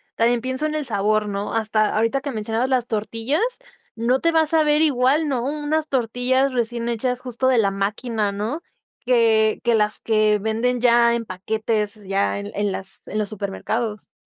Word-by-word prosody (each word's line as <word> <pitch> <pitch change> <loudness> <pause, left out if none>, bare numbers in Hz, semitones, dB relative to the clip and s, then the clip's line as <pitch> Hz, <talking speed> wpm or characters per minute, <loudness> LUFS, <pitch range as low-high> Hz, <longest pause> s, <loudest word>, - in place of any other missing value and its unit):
también 235 +1 +2
pienso 260 +4 -2
en 310 0 -1
el 305 -2 -2
sabor, 210 -1 +1
¿no? 200 0 -3
Hasta 215 -1 +1
ahorita 230 +5 +1
que 280 +1 -4
mencionabas 225 +2 -2
las 250 -3 +1
tortillas, 225 +6 -1 0.6
no 235 +3 +1
te 335 - +2
va 325 -1 +4
a 315 - 0
saber 305 -1 +3
igual, 290 +1 +3
¿no?, 260 -4 -1
unas 300 +3 -1
tortillas 260 +1 +1
recién 235 -1 -1
hechas 250 +2 -1
justo 255 0 -2
de 260 -1 +4
la 200 -3 +3
máquina, 210 +2 -1
¿no? 215 +11 -3 0.4
que 225 -3 +3
que 235 - +2
las 215 -1 +1
que 215 -1 +2
venden 225 +4 -1
ya 235 -1 +4
en 235 -1 -3
paquetes, 210 +2 -2
ya 195 +1 0
en 200 +1 -6
en 205 0 -1
las 195 0 -8
en - - -4
los 210 -2 -1
supermercados. 210 +1 -4
230 Hz, 180 wpm, -22 LUFS, 215-260 Hz, 0.6 s, va